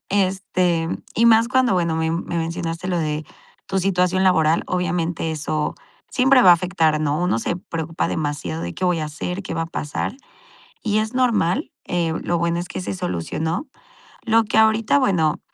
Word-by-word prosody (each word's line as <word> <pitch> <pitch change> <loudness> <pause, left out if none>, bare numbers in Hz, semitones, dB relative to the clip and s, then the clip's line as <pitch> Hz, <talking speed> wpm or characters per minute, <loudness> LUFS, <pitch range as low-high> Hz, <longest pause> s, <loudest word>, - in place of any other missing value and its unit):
este, 185 -4 +1 0.3
y 230 - +2
más 230 0 +5
cuando, 255 -1 +3
bueno, 170 -3 +1
me 160 0 0
me 170 +1 -3
mencionaste 165 +1 -3
lo 180 -2 0
de 155 -1 -2 0.4
tu 195 - -1
situación 185 0 +1
laboral, 165 -3 +3
obviamente 175 -2 -1
eso 155 -1 -2 0.4
siempre 260 0 +5
va 185 - +8
a - - +11
afectar, 165 -3 +1
¿no?, 150 0 0
uno 175 -9 +1
se 170 - -2
preocupa 165 -4 -3
demasiado 145 - -3
de, 85 0 -5
¿qué - - -3
voy 180 -2 +2
a 155 - -2
hacer?, 180 +5 -5
¿qué 175 - -5
va 165 - -1
a - - -4
pasar?, 165 - -4 0.7
y 215 -2 0
es 220 +2 -2
normal, 245 - +1
eh, 170 -2 -1
lo 175 - 0
bueno 170 0 0
es 175 - -5
que - - -5
se - - -4
solucionó. 175 - -3 0.6
Lo 225 -1 +3
que 215 - -1
ahorita, 220 +4 +4
bueno, 170 - +1
175 Hz, 180 wpm, -21 LUFS, 160-195 Hz, 0.7 s, a